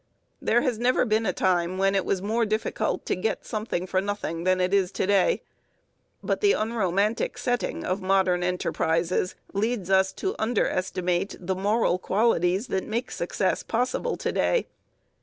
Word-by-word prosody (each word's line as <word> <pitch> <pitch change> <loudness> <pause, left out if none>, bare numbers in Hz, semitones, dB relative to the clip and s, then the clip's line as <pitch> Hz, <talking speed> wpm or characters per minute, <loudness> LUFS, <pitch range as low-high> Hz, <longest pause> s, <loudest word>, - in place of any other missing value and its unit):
There 240 - +3
has 245 -5 -1
never 250 +1 +3
been 220 -1 +1
a - - +3
time 180 0 +1
when 195 +1 +2
it 195 -1 +1
was 190 -1 -1
more 225 +3 +1
difficult 215 0 -1
to - - 0
get 200 +5 -2
something 215 -5 -3
for 185 0 0
nothing 190 -4 -3
than 185 0 +3
it 180 +1 +1
is 195 -2 +2
to 190 - 0
day, 200 - +2 0.8
but - - -1
the 410 -1 +5
unromantic 215 -1 0
setting 245 -1 -2
of 185 +2 -1
modern 185 -1 +2
enterprises 180 0 0 0.2
leads 205 -2 -1
us 190 0 +4
to 385 0 -2
underestimate 185 -4 0
the 185 +1 -2
moral 200 -1 +1
qualities 190 -1 +1
that 190 - -2
make 230 +4 -2
success - - -1
possible 250 - -1
to - - -2
day. - - +1
195 Hz, 160 wpm, -26 LUFS, 185-225 Hz, 0.8 s, the